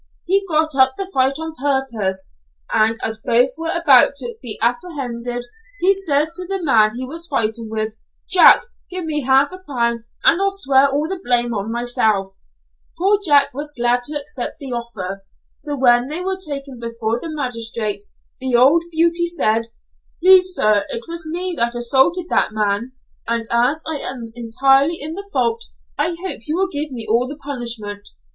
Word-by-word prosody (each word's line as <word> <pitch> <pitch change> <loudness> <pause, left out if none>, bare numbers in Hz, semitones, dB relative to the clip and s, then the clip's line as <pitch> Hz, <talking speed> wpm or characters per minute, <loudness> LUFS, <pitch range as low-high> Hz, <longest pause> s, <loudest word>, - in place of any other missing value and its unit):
He 390 +3 +2
got 315 -1 +1
up 265 -1 +4
the 390 -1 -5
fight 265 +1 +2
on 320 0 -6
purpose, 250 -10 -2 0.4
and 220 +1 +3
as 220 0 -2
both 245 +3 +4
were 325 0 -4
about 290 -6 +5
to 245 -4 -5
be 230 -4 -2
apprehended, 245 -2 -3 0.3
he 380 +2 +4
says 315 -5 0
to 360 +1 -6
the 390 +1 -2
man 220 -6 +3
he 255 +1 -4
was 330 +6 -6
fighting 225 -4 -2
with, 220 0 -3 0.3
'Jack, 375 -2 +7 0.3
give 365 -2 -5
me 300 -2 -1
half 270 +3 +3
a 370 - -9
crown 235 -8 -2 0.2
and 355 - +4
I'll 395 - +3
swear 280 -8 +3
all 290 +3 -1
the 375 0 -5
blame 240 -1 +2
on 210 +1 -3
myself;' 220 -5 0 0.7
poor 395 +3 +2
Jack 285 -4 +4
was 295 +3 -6
glad 240 +1 +2
to 295 +1 -3
accept 280 -3 -5
the 275 -4 -7
offer, 200 -5 -5 0.3
so 290 -1 -5
when 245 -1 +4
they 310 +5 -4
were 380 +1 -1
taken 275 -6 -5
before 230 0 -3
the 330 - -6
magistrate 230 -7 -3 0.3
the 260 -1 -1
old 280 +8 +5
beauty 340 +1 +1
said 230 -9 +1 0.5
'Please 370 0 +5
sir, 215 -5 +3
it 230 - -3
was 335 -1 -5
me 355 +3 -3
that 235 +1 0
assaulted 265 +9 +2
that - - +1
man, 215 +3 -1 0.3
and 230 0 -1
as 245 +7 +1
I 320 -2 -2
am 245 -4 -2
entirely 270 +7 +2
in 305 +3 -4
the 400 +3 -8
fault 460 +1 0 0.3
I 325 +4 0
hope 375 - -2
you 305 - -1
will 385 0 +1
give 300 -2 -3
me 235 -3 -6
all 235 +3 +2
the 285 +2 -8
punishment.' 235 -8 -6
270 Hz, 180 wpm, -19 LUFS, 235-325 Hz, 0.7 s, Jack